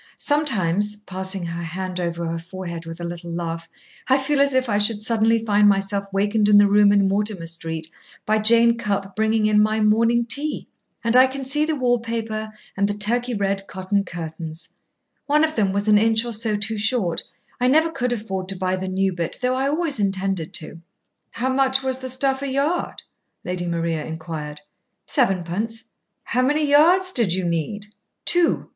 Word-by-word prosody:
Sometimes," 210 - +1
passing 190 -2 -3
her 170 0 -5
hand 180 +2 -5
over 170 -1 -3
her 165 0 -3
forehead 170 -1 -7
with 165 +1 -8
a - - -6
little 170 0 -6
laugh, 165 -1 -4 0.4
"I 265 - +4
feel 275 +1 +1
as 280 -1 +2
if 260 0 +2
I 205 -2 +1
should 210 0 +2
suddenly 225 +1 +1
find 205 -1 +4
myself 200 0 0
wakened 205 +2 +1
in 205 - +7
the 205 - +7
room 205 0 +5
in 200 -1 +3
Mortimer 200 -2 -1
Street 165 -1 -4 0.4
by 215 0 +2
Jane 235 +2 +4
Cupp 200 -3 -2
bringing 220 0 +1
in 210 0 +4
my 215 +1 +1
morning 230 +2 +3
tea. 285 +5 -1 0.4
And 230 +1 +1
I 255 +1 +7
can 270 0 -6
see 295 +3 +3
the 315 0 -1
wallpaper 230 -4 -1 0.3
and 200 +1 +1
the 205 - -2
Turkey 240 +3 0
red 195 -1 -1
cotton 195 +1 -1
curtains. 165 -2 -7 0.6
One 300 +1 +3
of 315 0 0
them 200 -4 +1
was 200 +2 -1
an 210 -1 +6
inch 225 +1 +3
or 235 - -4
so 220 0 -1
too 210 +1 -2
short. 210 -6 0 0.4
I 250 - +2
never 315 +5 +3
could 250 -4 -2
afford 195 -5 -4
to 195 - -2
buy 185 0 -1
the 190 0 -4
new 190 0 0
bit, 170 -2 -4
though 250 0 0
I 265 +1 0
always 295 -3 0
intended 195 -4 -1
to." 165 -1 -5 0.5
"How 255 +3 -2
much 265 0 +2
was 260 -1 -1
the 260 0 -5
stuff 265 +1 0
a 280 - -3
yard?" 280 +6 -1 0.4
Lady 180 -1 -3
Maria 165 -2 -1
inquired. 160 -2 -6 0.4
"Sevenpence." 215 - -1 0.3
"How 250 - 0
many 295 +4 +2
yards 345 +6 +5
did 225 - +1
you 185 -1 -2
need?" 170 +5 -2 0.4
"Two. 350 -1 +2
210 Hz, 185 wpm, -22 LUFS, 185-245 Hz, 0.6 s, in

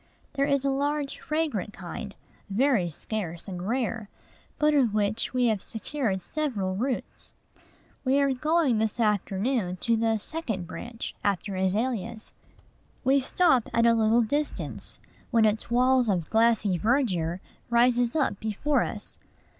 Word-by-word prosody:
There 280 0 +1
is 280 -1 +1
a 275 - +2
large, 285 +1 -1
fragrant 300 - -2
kind, 245 - -7 0.3
very 220 -4 +2
scarce 170 +1 -5
and 180 -1 -5
rare, 230 -3 -2 0.5
but 300 0 +3
of 250 -7 +3
which 210 +1 0
we 250 -1 +1
have 220 -4 +1
secured 225 -4 -3
several 210 - -2
roots. 250 +5 -4 0.7
We 270 +1 +3
are 280 -1 +3
going 300 -3 +2
this 220 +2 -1
afternoon 205 -1 0
to 230 -1 +2
the 225 0 +1
"second 220 - -3
branch" 235 +6 -6
after 200 0 -1
azaleas. 220 +3 -1 0.7
We 270 +1 +4
stop 265 -2 +2
at 230 0 +4
a 235 - +6
little 225 +1 +3
distance, 290 +6 -3 0.3
when 230 -3 +4
its 215 +2 0
wall 255 +2 +4
of 175 -5 -1
glossy 220 -5 +3
verdure 190 - +1 0.3
rises 240 +1 +3
up 275 -10 +1
before 220 +7 0
us. - - -5
230 Hz, 140 wpm, -27 LUFS, 205-270 Hz, 0.7 s, a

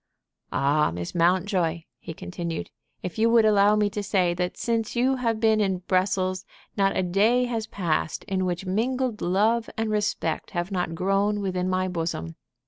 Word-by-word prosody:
"Ah, 145 +3 +2
Miss 85 +1 -5
Mountjoy," 175 -1 +1 0.2
he - - -8
continued, 170 -2 -5 0.3
"if 180 +4 -5
you 225 +1 +4
would 230 -1 +5
allow 205 -1 +5
me 210 -1 +2
to 210 0 -3
say 190 -4 +1
that 180 +1 -3
since 230 -1 -1
you 260 +2 +2
have 230 -3 0
been 220 -1 +3
at 185 -3 -1
Brussels 185 0 +1 0.3
not 195 -1 +2
a - - +2
day 215 +8 +3
has 225 -3 -3
passed 165 -4 -2
in 190 -2 -1
which 180 +1 -3
mingled 235 +4 -1
love 220 +6 +1
and 225 -1 -1
respect 205 -6 -1
have 175 +3 -2
not 180 -3 -2
grown 195 +3 +1
within 185 -2 -1
my 185 0 0
bosom. 165 - -3
190 Hz, 170 wpm, -25 LUFS, 175-215 Hz, 0.3 s, would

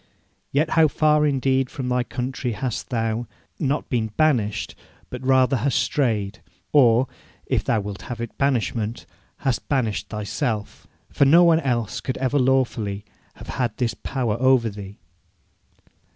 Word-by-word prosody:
Yet 150 +3 +1
how 160 -1 +5
far 150 0 +3
indeed 135 -2 +1
from 130 -2 -5
thy 125 0 +1
country 125 0 -3
hast 125 +2 -4
thou, 115 -1 -1 0.3
not 145 -1 -1
been 115 -3 0
banished, 125 -10 +1 0.4
but - - -6
rather 130 0 +3
hast 130 +3 0
strayed; 110 -5 0 0.3
or, 125 -3 +5 0.4
if - - 0
thou 110 - +1
wilt 100 0 -6
have 120 - -5
it 115 -1 -5
banishment, 120 -4 -1 0.4
hast 130 -3 -1
banished 125 -7 -1
thyself! 105 +1 -3 0.2
For 140 - +3
no 165 +6 +7
one 165 -2 +5
else 120 -5 -1
could 130 +3 -3
ever 135 +2 +1
lawfully 120 -6 0 0.3
have - - -12
had 120 -4 -2
this 120 -3 0
power 120 -5 -2
over 130 -3 +3
thee. 100 0 -9
125 Hz, 145 wpm, -23 LUFS, 110-135 Hz, 0.4 s, no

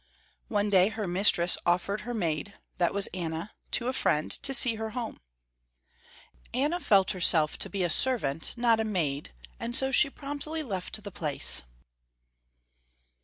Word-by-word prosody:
One 205 -2 -1
day 185 -1 +4
her 220 -1 -5
mistress 175 -1 +3
offered 180 +4 -1
her 245 - -6
maid 175 0 -3 0.2
that 175 -1 +1
was 200 0 +1
Anna 165 +1 -5 0.2
to 240 - -2
a 255 - -1
friend, 155 -11 -1
to 275 - +2
see 255 -3 +6
her 220 0 -5
home. 235 -3 -5 1.4
Anna 295 +7 0
felt 195 - +2
herself 165 -4 +4
to - - -3
be 195 -2 -3
a 175 - 0
servant, 160 - -1
not 235 -2 +2
a - - 0
maid, 155 - -3 0.3
and 235 +1 -4
so 265 0 +2
she 280 +1 +5
promptly 290 +3 -4
left 200 -2 -5
the 200 - -8
place. 150 -5 +2
205 Hz, 155 wpm, -27 LUFS, 175-240 Hz, 1.4 s, see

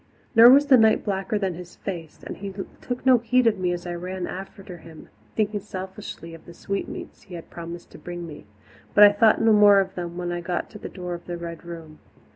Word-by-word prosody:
Nor 230 0 +9
was 280 +3 +7
the 275 -3 +6
night 220 -1 +4
blacker 195 0 -1
than 195 -3 -1
his 175 +1 -11
face, 170 -5 -7
and - - -7
he 200 0 -6 0.3
took 250 0 -5
no 255 -2 +6
heed 250 +2 +2
of 215 -4 +2
me 180 -1 0
as 175 0 -4
I 175 - -4
ran 180 +1 -5
after 190 0 -8
him, 160 -1 -14 0.3
thinking 210 -1 0
selfishly 190 -3 -8
of 165 - -13
the 170 - -12
sweetmeats 200 +2 -6
he 190 -3 -11
had 165 - -10
promised 170 0 -9
to - - -13
bring 175 -1 -7
me 150 -9 -11 0.5
but 210 - +9
I 205 - +9
thought 215 +2 +4
no 225 -1 +5
more 205 -1 +7
of 190 -1 -1
them 175 -1 -6
when 175 -1 -3
I 175 0 -3
got 175 0 -3
to 210 - -10
the - - -7
door 180 -2 -6
of 175 - -8
the 175 -1 -4
Red 170 0 -8
Room. 165 -2 -10
185 Hz, 235 wpm, -24 LUFS, 175-210 Hz, 0.5 s, Nor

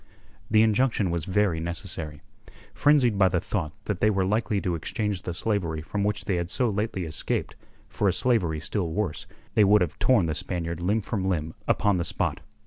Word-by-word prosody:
The 110 0 +5
injunction 110 -3 +2
was 85 -2 -2
very 95 -3 +1
necessary. 80 -3 -6 0.5
Frenzied 130 -8 +3
by 95 - +6
the 90 -1 +1
thought 85 -3 -3
that 100 -4 -3
they 105 - +5
were 95 -3 +1
likely 105 +1 +1
to 90 - -1
exchange 100 +4 -2
the 90 - -4
slavery 85 -6 -1
from 100 +4 -2
which 105 -1 -1
they 95 - 0
had 85 0 -2
so 125 0 +1
lately 105 -2 -2
escaped 75 -3 -2 0.3
for 105 - -1
a 95 - +3
slavery 90 -11 +1
still 85 +3 -2
worse, 90 -2 -3 0.3
they 105 - +5
would 105 +1 +5
have 85 -4 -1
torn 120 -9 +4
the 80 - -1
Spaniard 85 0 -3
limb 100 +5 0
from 100 -3 -2
limb 80 -3 -1
upon 100 -2 +2
the 85 - 0
spot. - - -2
95 Hz, 195 wpm, -26 LUFS, 85-105 Hz, 0.5 s, by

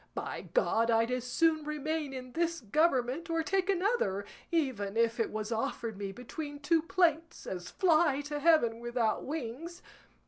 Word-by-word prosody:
By - - -5
God 230 - +3
I'd 230 +1 +3
as 250 -1 -2
soon 315 +5 +2
remain 305 0 -2
in 255 -1 -7
this 335 +3 0
government, 270 - +1
or 330 0 +1
take 380 +2 0
another, 370 - +1 0.3
even 245 -11 -1
if 230 +1 +2
it 225 - +1
was 215 +1 -4
offered 225 0 -2
me 195 0 -4
between 290 - -7
two 320 +3 +2
plates, 330 -1 +1
as 180 -1 -5
fly 315 -5 +3
to 295 0 -4
heaven 285 -8 +4
without 240 -2 0
wings. 310 +4 -5
285 Hz, 160 wpm, -31 LUFS, 230-330 Hz, 0.3 s, heaven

